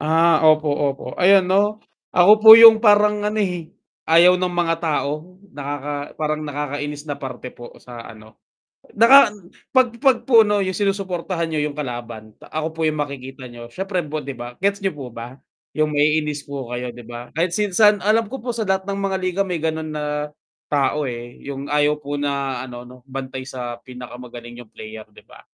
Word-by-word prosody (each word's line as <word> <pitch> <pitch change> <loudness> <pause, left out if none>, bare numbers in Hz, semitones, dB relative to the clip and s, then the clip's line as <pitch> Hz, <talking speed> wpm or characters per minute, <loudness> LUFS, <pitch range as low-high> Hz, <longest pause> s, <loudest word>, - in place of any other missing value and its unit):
Ah, 160 +2 +3
opo, 155 0 +3
opo 140 -1 -2 0.2
ayan 190 +1 +5
'no, 205 +3 +1 0.4
ako 180 +4 +6
po 220 - +9
yung 225 -1 +9
parang, 210 -1 +4
ano, 210 +1 -2
eh, 180 -5 -3 0.4
ayaw 175 +3 +6
ng 180 -1 -1
mga 165 -1 +1
tao, 155 +2 -3 0.2
nakaka 145 0 -5
parang 155 0 -2
nakakainis 145 0 -5
na 145 - -3
parte 125 -1 -7
po 120 - -12
sa, 120 -1 -11
ano, 110 0 -17 0.6
naka 235 +2 +7 0.4
pag 260 -2 +4
pag 265 -4 +4
po, 230 -3 +7
'no, 205 -1 0
yung 185 -1 -2
sinusuportahan 190 -4 -2
nyo 155 -2 -2
yung 150 -1 -4
kalaban, 120 -5 -7
ako 155 0 -4
po - - -7
yung 155 -1 0
makikita 135 -2 -7
niyo, 120 0 -11
syempre 190 -1 -3
po 155 +1 -5
'di 140 -1 -7
ba? 120 +1 -9
Gets 200 +1 0
niyo 195 - 0
po 140 -4 -8
ba 120 +4 -9 0.3
yung 155 0 0
maiinis 150 -1 0
po 140 -3 -7
kayo 120 0 -5
'di 120 - -12
ba? 120 0 -9
Kahit 170 +2 -1
si 205 -2 -1
saan 210 0 +4
alam 220 +1 +2
ko 265 - -6
po 245 - -2
sa 225 -3 -4
lahat 190 0 0
ng 200 0 -4
mga 195 -1 -1
liga 185 0 -3
may, 180 -2 -3
ganun, 160 -1 -2
na 150 0 -3 0.4
tao, 145 +1 +1
eh, 120 0 -8
yung 140 0 -6
ayaw 150 0 +1
po 145 0 -5
na, 140 -3 -3
ano-no, 125 0 -11
bantay 130 -1 -7
sa 125 -2 -6
pinakamagaling 120 -1 -10
yung 120 - -14
player 110 0 -10
'di 105 - -19
ba? - - -17
150 Hz, 190 wpm, -20 LUFS, 130-185 Hz, 0.6 s, po